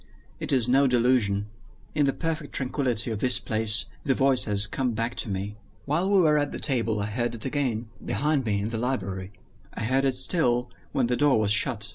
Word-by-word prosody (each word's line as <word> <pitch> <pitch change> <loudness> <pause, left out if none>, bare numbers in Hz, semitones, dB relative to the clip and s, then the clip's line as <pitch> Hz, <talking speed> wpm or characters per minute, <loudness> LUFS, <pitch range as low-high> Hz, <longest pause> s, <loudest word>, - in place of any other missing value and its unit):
It - - -2
is 125 -4 +3
no 135 +2 +4
delusion. 120 -5 +2 0.5
In 145 -2 +2
the - - +3
perfect 160 -1 -4
tranquillity 125 -4 -1
of 110 - -3
this 125 +1 +3
place 110 -2 +1 0.2
the 135 -4 0
voice 135 -2 +3
has 105 -1 +3
come 125 +3 -2
back 115 +2 -1
to - - -2
me. 100 +2 -4 0.3
While 170 +7 0
we 200 -1 +4
were 155 -4 +4
at 145 -1 -2
table 115 -6 +1
I - - -1
heard 120 +3 -2
it 110 - -2
again 125 -5 -1 0.2
behind 150 -1 0
me, 100 -3 0
in 105 - -2
the 115 -1 -3
library. 100 -7 -3 0.4
I - - -4
heard 130 +4 +1
it 130 -2 +1
still, 125 -3 +1 0.2
when 130 - +1
the 125 +1 0
door 140 -3 +3
was 105 -1 +1
shut. 110 0 +1
125 Hz, 205 wpm, -26 LUFS, 110-135 Hz, 0.5 s, no